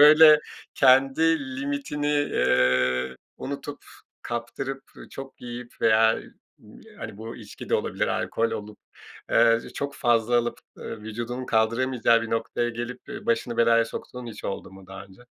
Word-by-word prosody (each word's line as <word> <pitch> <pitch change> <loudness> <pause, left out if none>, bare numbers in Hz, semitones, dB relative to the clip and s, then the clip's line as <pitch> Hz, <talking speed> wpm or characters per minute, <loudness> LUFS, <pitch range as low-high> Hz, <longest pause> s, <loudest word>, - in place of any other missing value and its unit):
böyle, 155 0 +9 0.3
kendi 135 +5 +4 0.2
limitini, 145 +1 -3
eee, 65 - +2 0.2
unutup, 140 +1 -6 0.4
kaptırıp, 120 +3 -4
ı - - -12
çok 135 0 -10
yiyip 120 0 -8
veya 110 0 +5 0.4
b - - -17
hani, - - -7
bu 115 +1 -7
içki 105 -3 -10
de - - +2
olabilir - - 0
alkol 115 0 0
olup, 105 0 -6 0.5
aaa, 115 0 +5
çok 140 0 -4
fazla 120 -1 +2
alıp, 120 0 -1 0.2
ııı, 110 - -7
vücudunu 120 +4 -5
kaldıramayacağı 115 +1 +2
bir 115 - -5
noktaya 115 +1 -1
gelip, 120 +1 -6
ııı, 220 -1 -7
başını 230 - 0
belaya 115 -1 +4
soktuğun 125 +1 -8
hiç 110 -2 -9
oldu 95 - -5
mu 95 -1 -14
daha 95 - -9
önce? 95 +5 -18
120 Hz, 145 wpm, -25 LUFS, 110-135 Hz, 0.5 s, böyle